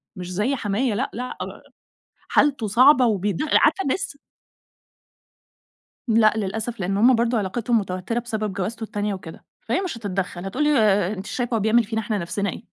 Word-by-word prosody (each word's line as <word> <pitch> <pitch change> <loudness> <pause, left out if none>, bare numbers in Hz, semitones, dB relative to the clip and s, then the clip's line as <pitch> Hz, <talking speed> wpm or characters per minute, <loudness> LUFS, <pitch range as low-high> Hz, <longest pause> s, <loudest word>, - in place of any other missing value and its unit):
مش 180 -1 -7
زي 220 +9 0
حمايا 215 +1 -1
لأ، 260 +5 -1
لأ 250 +2 -5 0.9
حالته 275 -7 +2
صعبة 255 +4 +6
وبيد 205 - 0
عارفة 315 +5 +3
الناس 330 +3 -2 1.9
لأ 220 -1 +4
للأسف 220 +3 -3
لإن 195 +2 -1
هم 245 +4 +5
برضه 235 0 +1
علاقتهم 225 +3 0
متوترة 185 +4 -3
بسبب 215 -4 -3
جوازته 210 +4 -4
التانية 210 -2 -2
وكده، 170 -4 -10 0.2
فهي 390 - -1
مش 360 -11 -4
هتتدخَّل 195 -3 -4
هتقول 195 +10 -1
لي 300 - +3
ما 205 -6 +3
انتيش 190 0 -7
شايفة 245 -2 -1
هو - - +1
بيعمل 220 +3 +3
فينا 220 +1 -3
إحنا 215 -1 -2
نفسنا 200 +3 -2
إيه؟ - - -7
220 Hz, 165 wpm, -23 LUFS, 195-240 Hz, 1.9 s, صعبة